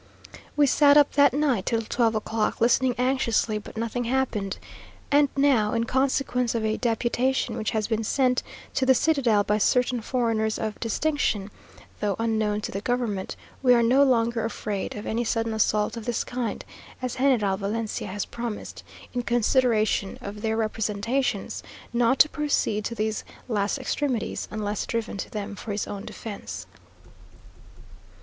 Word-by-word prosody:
We 295 - +6
sat 285 +1 +5
up 290 -1 +5
that 285 -2 +5
night 270 -7 0
till 230 -1 +1
twelve 225 0 +1
o'clock, 215 0 -1
listening 245 +2 +3
anxiously, 240 -4 +1
but 210 - -11
nothing 230 +2 -2
happened; 235 -6 -1 0.5
and 290 0 +5
now, 260 -7 +3
in 230 0 +1
consequence 250 -1 0
of 225 -1 0
a 215 0 +1
deputation 240 +1 0
which 220 -2 -2
has 220 -2 -1
been 225 -1 -1
sent 250 +2 +2 0.3
to - - 0
the 260 - +6
citadel 245 -9 +3
by 210 +1 +1
certain 250 +2 +2
foreigners 225 -3 0
of 215 -1 -4
distinction 230 -4 0 0.5
(though 205 -2 0
unknown 220 -2 0
to - - -4
the 195 - -4
government), 235 -5 -2 0.3
we 250 -2 +6
are 235 - +4
no 255 +4 +4
longer 235 -4 +3
afraid 210 -3 -3
of 210 - -6
any 230 +2 -1
sudden 225 -1 -1
assault 210 0 +1
of 230 -2 -7
this 240 -2 -1
kind, 245 -2 -4 0.3
as 255 -1 -4
General 245 -8 +3
Valencia 210 +2 -3
has 200 +1 -3
promised, 235 -3 -6 0.3
in 245 - 0
consideration 235 -4 +1
of 205 +1 -7
their 220 0 0
representations, 220 +3 -1 0.3
not 235 +2 +3
to 300 - +7
proceed 290 -9 0
to 235 - -3
these 215 -1 -1 0.2
last 205 0 0
extremities, 260 -3 -2
unless 210 -1 -3
driven 230 -3 -2
to - - -5
them 210 -1 -5
for 215 - -6
his 205 - -2
own 200 -1 -6
defence. 210 -3 -7
230 Hz, 155 wpm, -25 LUFS, 215-255 Hz, 0.5 s, to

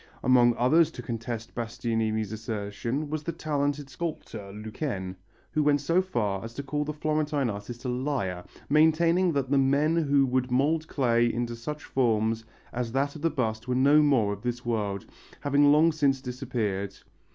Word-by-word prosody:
Among 120 -2 +5
others 155 +6 +4
to 125 - -8
contest 115 -1 -5
Bastianini's 115 -2 -2
assertion 110 +6 -4
was 155 -1 -2
the 170 - -3
talented 145 -3 -2
sculptor 130 -9 -6
Lequesne, 105 -2 -4 0.4
who 155 - +1
went 145 -1 +3
so 165 +6 +2
far 105 - -2
as 115 +1 -8
to 140 - -4
call 145 +2 -2
the 150 - -3
Florentine 150 -4 0
artist 115 +5 -8
a - - 0
liar, 125 -9 -2 0.2
maintaining 165 +4 +4
that 135 -2 -1
the 140 - +4
men 140 +4 +3
who 145 -4 +3
could 125 0 0
mould 150 +5 +1
clay 120 -4 +2
into 120 0 -3
such 150 +6 -6
forms 110 -3 0 0.3
as 120 -1 -3
that 140 +2 0
of 155 - -8
the 165 - +2
bust 115 -7 -2
were 125 - 0
no 140 +4 +5
more 125 -9 +3
of 100 - -9
this 120 0 -3
world, 105 -4 -2 0.4
having 145 0 +4
long 155 +3 +5
since 140 -4 +1
disappeared. 115 -7 -3
130 Hz, 170 wpm, -27 LUFS, 115-150 Hz, 0.4 s, Among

